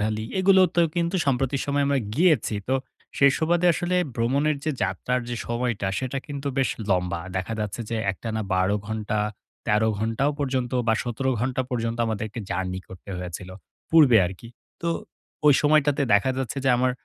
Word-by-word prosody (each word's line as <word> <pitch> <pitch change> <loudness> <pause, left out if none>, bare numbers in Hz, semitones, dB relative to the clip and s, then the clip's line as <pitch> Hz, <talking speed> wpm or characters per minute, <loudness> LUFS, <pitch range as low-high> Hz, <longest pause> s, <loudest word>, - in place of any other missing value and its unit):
Valley, 110 +1 -1
এগুলোতে 185 -2 +4 0.2
কিন্তু 170 +2 +1
সম্প্রতি 135 0 +1
সময়ে 140 0 +1
আমরা 140 -1 +2 0.2
গিয়েছি। 155 - +3
তো 130 - +2 0.4
সেই 140 0 +7
সুবাদে 175 +2 +2
আসলে 175 +2 -1 0.2
ভ্রমণের 140 +5 +1 0.3
যাত্রার 125 0 -1
যে 120 - -3
সময়টা, 120 -3 -1
সেটা 130 +1 -3
কিন্তু 140 -1 -4
বেশ 135 - +2 0.2
লম্বা। 90 -2 0 0.2
দেখা 95 +4 -2
যাচ্ছে 105 +2 -3
যে 115 - -1
একটানা 110 +3 -4
১২ 95 +2 +2
ঘন্টা, 105 -1 -2 0.5
১৩ 110 0 +3
ঘন্টাও 115 +6 0
পর্যন্ত 130 -3 -1 0.2
বা 110 - +5
১৭ 125 +2 -1
ঘন্টা 130 +1 0
পর্যন্ত 115 -1 -2
আমাদেরকে 110 0 -3
জার্নি 95 0 -2
করতে 95 +1 -11
হয়েছিল। 90 +1 -6 0.4
পূর্বে 150 -7 +7
আরকি। 95 +6 -9 0.3
তো 170 - 0 0.6
ওই 145 - +8
সময়টাতে 145 -1 +3
দেখা 100 +6 +3
যাচ্ছে 135 +1 -3
যে, 135 - +3
আমার 125 +1 +2
125 Hz, 160 wpm, -25 LUFS, 110-140 Hz, 0.6 s, ওই